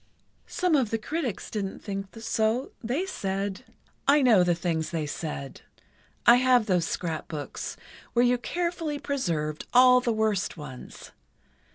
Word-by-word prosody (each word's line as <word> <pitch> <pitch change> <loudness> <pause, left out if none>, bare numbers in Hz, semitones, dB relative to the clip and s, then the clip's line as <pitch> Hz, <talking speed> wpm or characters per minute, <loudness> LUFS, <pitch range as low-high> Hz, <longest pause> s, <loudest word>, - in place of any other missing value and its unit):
"Some 360 -3 +1
of 260 -6 +2
the 225 - 0
critics 255 - -4
didn't 200 -3 -4
think 195 -2 -4
so; 225 +3 0
they 260 +11 -1
said——" 195 - -3 0.4
"I 285 0 +5
know 220 -8 +6
the 175 -1 +2
things 165 -2 -1
they 165 -3 -2
said. 145 -2 -5 0.6
I 240 - +8
have 250 -2 +4
those 180 -5 +2
scrapbooks, 160 -3 -4 0.4
where 240 +1 +4
you 245 0 +3
carefully 340 +1 -2
preserved 165 - -2
all 250 0 +7
the 245 -2 0
worst 215 -5 0
ones. 140 -5 -10
220 Hz, 140 wpm, -27 LUFS, 175-255 Hz, 0.6 s, I